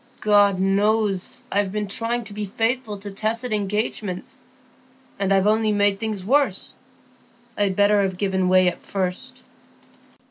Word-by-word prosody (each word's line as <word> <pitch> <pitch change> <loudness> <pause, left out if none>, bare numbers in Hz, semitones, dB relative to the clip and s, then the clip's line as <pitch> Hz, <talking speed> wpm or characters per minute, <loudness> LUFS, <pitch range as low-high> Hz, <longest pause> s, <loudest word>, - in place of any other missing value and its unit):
God 205 -2 +4
knows, 200 0 +1
I've 200 -1 0
been 210 +1 -2
trying 235 +4 -1
to 205 -2 -9
be 210 0 -4
faithful 225 +2 -1
to 200 +1 -8
tacit 220 +4 -2
engagements, 205 -2 -3 0.8
and 195 -1 0
I've 195 0 +3
only 215 +1 +2
made 205 -1 +2
things 215 -4 -4
worse; 260 -4 +2 0.8
I'd 200 -2 0
better 205 +1 +4
have 190 -2 -1
given 190 -2 0
way 185 0 +5
at 180 - -2
first." 185 -2 -3
205 Hz, 140 wpm, -22 LUFS, 195-215 Hz, 0.8 s, way